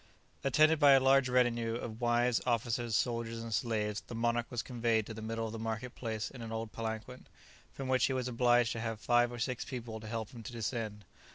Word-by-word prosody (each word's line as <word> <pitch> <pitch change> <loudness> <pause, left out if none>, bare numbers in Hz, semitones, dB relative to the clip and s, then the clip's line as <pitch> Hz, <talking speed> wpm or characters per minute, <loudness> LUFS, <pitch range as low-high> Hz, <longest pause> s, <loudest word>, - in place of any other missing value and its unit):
Attended 155 +3 +4
by 145 -2 +8
a 135 - +7
large 135 0 +4
retinue 120 -2 +2
of 115 -1 -6
wives, 120 0 +2
officers, 120 -1 0
soldiers, 115 -1 -1
and 115 -1 -5
slaves, 105 -1 -1
the 120 - -7
monarch 120 +1 0
was 120 -1 -3
conveyed 115 -3 0
to 110 - -7
the 110 - -8
middle 115 +1 -3
of 110 - -4
the 115 - -6
market 115 +2 -4
place 110 -3 -4
in 125 - -10
an 115 -1 -6
old 110 -1 -4
palanquin, 115 +3 -5 0.4
from 135 - -6
which 130 0 +3
he 135 - -1
was 130 -1 -1
obliged 120 -1 +3
to 115 - -3
have 115 -1 -3
five 120 +2 +3
or 120 - -6
six 125 0 -2
people 120 -5 -6
to 110 - -9
help 110 -1 -4
him 120 - -9
to 125 - -7
descend. 110 -2 -4
115 Hz, 220 wpm, -33 LUFS, 115-125 Hz, 0.4 s, by